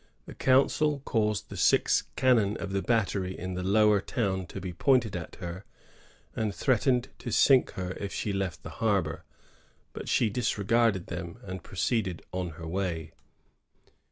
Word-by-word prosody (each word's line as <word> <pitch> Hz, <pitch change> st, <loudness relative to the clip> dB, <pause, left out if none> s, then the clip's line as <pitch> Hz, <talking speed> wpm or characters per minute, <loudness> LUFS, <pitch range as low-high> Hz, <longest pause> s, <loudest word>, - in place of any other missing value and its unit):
The -, -, -9 dB
council 140 Hz, +2 st, +2 dB
caused 105 Hz, -3 st, 0 dB
the -, -, -7 dB
six -, -, +3 dB
cannon 115 Hz, -6 st, +3 dB
of 100 Hz, -, -5 dB
the 100 Hz, 0 st, 0 dB
battery 100 Hz, -5 st, 0 dB
in 95 Hz, +1 st, -5 dB
the 90 Hz, -, -3 dB
Lower 105 Hz, +2 st, +4 dB
Town 95 Hz, -5 st, -2 dB
to 95 Hz, -, -7 dB
be 90 Hz, -1 st, -5 dB
pointed 120 Hz, +1 st, +2 dB
at 85 Hz, -2 st, -6 dB
her, 90 Hz, +1 st, -7 dB, 0.7 s
and 105 Hz, -3 st, -1 dB
threatened 125 Hz, 0 st, +2 dB
to 120 Hz, -, -5 dB
sink 130 Hz, +4 st, +4 dB
her 90 Hz, -1 st, -4 dB
if 100 Hz, -1 st, -4 dB
she 105 Hz, -, -2 dB
left 95 Hz, -3 st, -3 dB
the -, -, -7 dB
harbor; -, -, 0 dB, 0.7 s
but -, -, -6 dB
she 115 Hz, -, +3 dB
disregarded 110 Hz, -2 st, +1 dB
them, 85 Hz, +2 st, -6 dB
and 95 Hz, -3 st, -6 dB
proceeded 95 Hz, +1 st, -1 dB
on 90 Hz, -1 st, -3 dB
her 85 Hz, -, -8 dB
way. 85 Hz, -3 st, -3 dB
100 Hz, 155 wpm, -28 LUFS, 90-115 Hz, 0.7 s, Lower